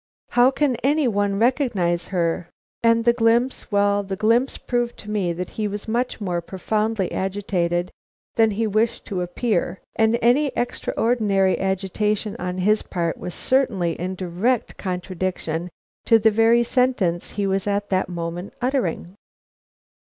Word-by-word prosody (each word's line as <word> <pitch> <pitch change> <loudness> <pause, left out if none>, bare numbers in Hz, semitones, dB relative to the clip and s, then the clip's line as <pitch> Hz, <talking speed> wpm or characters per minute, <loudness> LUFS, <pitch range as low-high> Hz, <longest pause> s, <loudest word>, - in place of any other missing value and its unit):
How 245 +1 +5
can 270 -2 0
any 290 +2 +2
one 205 -3 0
recognize 205 - +1
her 170 -2 -1 0.2
" - - -51
And 230 0 +4
the 235 - +5
glimpse 235 +2 +1
well, 205 0 +3
the 195 -1 -4
glimpse 230 +6 +2
proved 240 -1 -2
to 210 - -8
me 195 -5 0
that 180 +2 -5
he 210 - +1
was 205 +1 -6
much 240 +3 -1
more 180 -4 -2
profoundly 210 +2 -1
agitated 180 -3 -1 0.4
than 225 -1 +4
he 220 +2 -1
wished 220 +2 0
to 190 -4 -3
appear, 180 0 -1 0.2
and 225 +1 +3
any 250 +6 +3
extraordinary 215 -5 +1
agitation 200 +2 -1
on 180 0 -3
his 210 +3 +2
part 170 -3 -2
was 180 - -5
certainly 210 -10 +1
in 185 +1 -3
direct 190 +7 -1
contradiction 180 -2 -3 0.4
to 225 - +6
the 220 0 +4
very 225 +2 +4
sentence 235 -9 +1
he 205 - -2
was 195 +1 0
at 205 0 -1
that 185 0 +1
moment 175 +2 -5
uttering. 245 - -1
205 Hz, 150 wpm, -22 LUFS, 180-230 Hz, 0.4 s, to